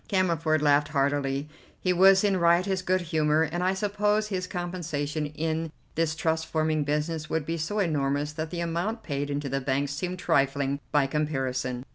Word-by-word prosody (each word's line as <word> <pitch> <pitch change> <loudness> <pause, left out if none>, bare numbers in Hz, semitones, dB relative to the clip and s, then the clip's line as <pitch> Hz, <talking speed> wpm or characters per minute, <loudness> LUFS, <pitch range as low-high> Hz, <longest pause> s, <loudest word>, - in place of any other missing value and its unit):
Cammerford 165 -6 +1
laughed 145 0 +4
heartily; 140 -1 0 0.3
he 185 - +1
was 190 +2 +6
in 200 -2 +2
riotous 180 +2 +3
good 185 0 +1
humour, 155 -2 +2
and 170 +3 -2
I 185 +1 +2
suppose 210 +2 0
his 185 -2 -2
compensation 160 -5 -3
in 160 +2 -2 0.2
this 160 -1 0
trust 160 0 -1
forming 155 -1 0
business 150 +2 -2
would 160 -2 -1
be 165 +1 -3
so 185 +7 -2
enormous 145 -5 0
that 155 +1 -4
the 175 0 -4
amount 175 +7 -2
paid 145 -1 -3
into 145 0 -2
the 135 +1 -1
bank 135 +1 0
seemed 180 +6 -3
trifling 140 -4 +1
by 145 -2 +3
comparison. 130 -4 -2
155 Hz, 170 wpm, -27 LUFS, 145-180 Hz, 0.3 s, was